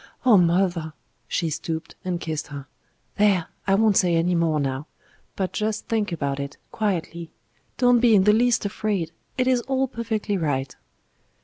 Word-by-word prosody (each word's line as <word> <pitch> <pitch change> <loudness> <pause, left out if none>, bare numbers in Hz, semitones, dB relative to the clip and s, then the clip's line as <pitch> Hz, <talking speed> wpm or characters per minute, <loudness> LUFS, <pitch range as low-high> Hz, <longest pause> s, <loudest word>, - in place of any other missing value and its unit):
"Oh! 240 -4 +7
mother!" 175 -3 +2 0.3
She 165 -2 -1
stooped 160 +2 -4
and 180 -2 -2
kissed 160 -3 -4
her. 140 -1 -8 0.5
"There! 200 -5 +3 0.2
I 195 - +4
won't 215 -1 +3
say 175 -2 +3
any 170 +2 +2
more 165 -3 +1
now. 135 +1 -2 0.5
But 190 -2 -2
just 215 0 -2
think 215 -3 0
about 140 -4 -2
it 140 0 -5
quietly. 170 -5 -2 0.5
Don't 245 -1 +4
be 230 -2 +5
in 190 - +5
the 210 +1 +5
least 240 0 +2
afraid; 200 -5 -2 0.3
it 255 - +2
is 255 -1 +2
all 265 0 +1
perfectly 220 -4 -2
right." 135 -5 -2
185 Hz, 165 wpm, -24 LUFS, 160-215 Hz, 0.5 s, Oh